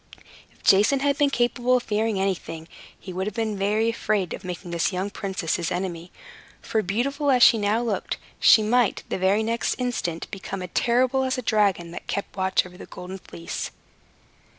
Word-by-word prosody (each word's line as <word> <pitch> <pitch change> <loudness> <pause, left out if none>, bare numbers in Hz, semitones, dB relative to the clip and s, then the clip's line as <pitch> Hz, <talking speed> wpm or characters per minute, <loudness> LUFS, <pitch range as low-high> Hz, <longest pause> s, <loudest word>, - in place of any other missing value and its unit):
If - - -27
Jason 210 +8 +5
had 280 0 +2
been 290 -1 +4
capable 245 -1 +1
of 245 - -4
fearing 215 -1 0
anything, 175 -4 -3 0.3
he 185 - -8
would 190 +2 -2
have 210 - -4
been 220 -3 -2
afraid 215 -2 0
of - - -7
making 180 -1 -6
this 170 +3 0
young 190 +2 -3
princess 190 -6 -2
his 170 -2 -2
enemy; 175 -1 -4 0.5
for, 220 - -1
beautiful 275 +9 -1
as 250 -3 +5
she 225 - +7
now 210 +3 +1
looked, 235 - -2 0.2
she 220 - +7
might, 235 0 +2
the - - -2
very 195 +4 +3
next 230 +1 -1
instant, 235 -10 -2
become 195 -1 -5
as 180 - -6
terrible 250 +2 +2
as 260 0 0
the 255 - -4
dragon 200 -6 +1
that - - -8
kept 200 - -4
watch 190 -1 +1
over 180 0 -13
the - - -9
Golden 185 +2 -8
Fleece. 85 - -6
205 Hz, 185 wpm, -24 LUFS, 185-235 Hz, 0.5 s, she